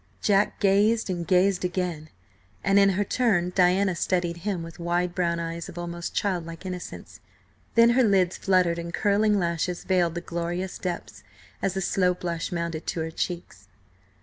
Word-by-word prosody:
Jack 200 0 +2
gazed, 205 +2 +3
and 170 -2 -4
gazed 185 +1 +3
again, 180 -4 -2 0.5
and 195 0 +4
in 195 0 +6
her 195 +1 +1
turn 195 -6 +1
Diana 185 +1 +3
studied 175 -1 0
him 180 -1 -3
with 165 0 -10
wide 175 +1 0
brown 170 -2 0
eyes 165 0 -5
of - - -11
almost 170 0 -5
childlike 175 -3 -2
innocence. 180 -1 -7 0.6
Then 230 0 +6
her 255 +2 +4
lids 190 -5 +3
fluttered 180 -3 +2
and 170 0 -5
curling 210 +3 +2
lashes 170 0 -1
veiled 175 -3 +1
the 170 - -3
glorious 175 +2 -4
depths, 180 -2 -5 0.4
as 195 0 -1
a - - 0
slow 180 -1 +2
blush 170 -2 -4
mounted 170 -2 -3
to 165 - -2
her 160 0 -3
cheeks. 165 - -5
180 Hz, 165 wpm, -26 LUFS, 170-195 Hz, 0.6 s, in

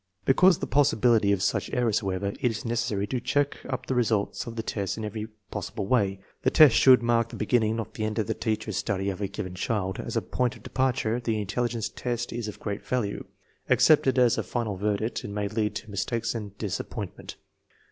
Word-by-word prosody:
Because 180 +7 +6
of - - -15
the - - 0
possibility 120 -7 +3
of 100 -1 +1
such 105 - 0
errors, 115 -3 +2
however, 100 -1 -2
it 125 - +3
is 110 0 -5
necessary 115 -3 -1
to 125 +4 -2
check 145 +3 0
up 130 - -3
the - - -1
results 115 -3 0
of 115 - -6
the 115 - -3
tests 100 -3 -3
in 110 - -4
every 105 +1 -4 0.2
possible 105 +1 -4
way. 100 -4 +1 0.2
The - - +3
test 155 -7 +7
should 130 -2 +7
mark 115 -1 +2
the - - -8
beginning, 110 -3 +1
not 110 -2 -5
the 110 - -4
end, 110 0 -3
of 110 - +1
the 110 - -1
teacher's 110 -3 -2
study 100 -1 -1
of 95 - -7
a 100 - 0
given 95 -2 -6
child. 95 -1 -2
As - - -3
a - - 0
point 125 -1 -1
of - - -16
departure 125 -3 0
the 115 -2 -1
intelligence 115 +2 -1
test 120 -1 -4
is 115 -2 -3
of 105 - -7
great 100 -1 -4
value; 120 -6 -2 0.4
accepted 140 -4 +5
as 125 -2 +4
a - - -1
final 115 -5 -2
verdict 105 +3 -1
it - - -6
may 100 0 -2
lead 105 0 -1
to 110 -1 -6
mistakes 115 +3 -1
and 105 -4 -6
disappointment. 100 -4 -5
110 Hz, 215 wpm, -27 LUFS, 100-120 Hz, 0.4 s, test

